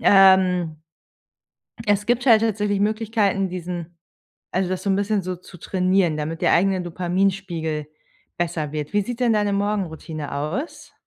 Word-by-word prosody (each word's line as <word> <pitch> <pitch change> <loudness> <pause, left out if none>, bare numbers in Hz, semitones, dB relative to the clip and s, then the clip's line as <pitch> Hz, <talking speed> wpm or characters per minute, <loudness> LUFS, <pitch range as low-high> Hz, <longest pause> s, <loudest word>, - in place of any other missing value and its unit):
Ähm. 185 -4 +5 1.1
Es 205 0 +2
gibt 245 +2 +1
halt 225 -3 +6
tatsächlich 210 -2 0
Möglichkeiten, 210 -2 +1
diesen 175 -1 -6 0.6
also 185 -1 0
das 185 0 -2
so 200 - -1
'n 195 - +3
bisschen 205 +1 0
so 185 +1 -3
zu 180 0 -14
trainieren, 185 -3 +1
damit 155 +2 -4
der - - +4
eigene 190 0 +3
Dopaminspiegel 175 -3 -1 0.5
besser 165 -4 -2
wird. 150 +2 -4
Wie 205 - +3
sieht 235 +4 -5
denn 240 -2 +3
deine 205 -1 +1
Morgenroutine 170 -7 -3
aus? 155 - -4
190 Hz, 145 wpm, -23 LUFS, 170-205 Hz, 1.1 s, halt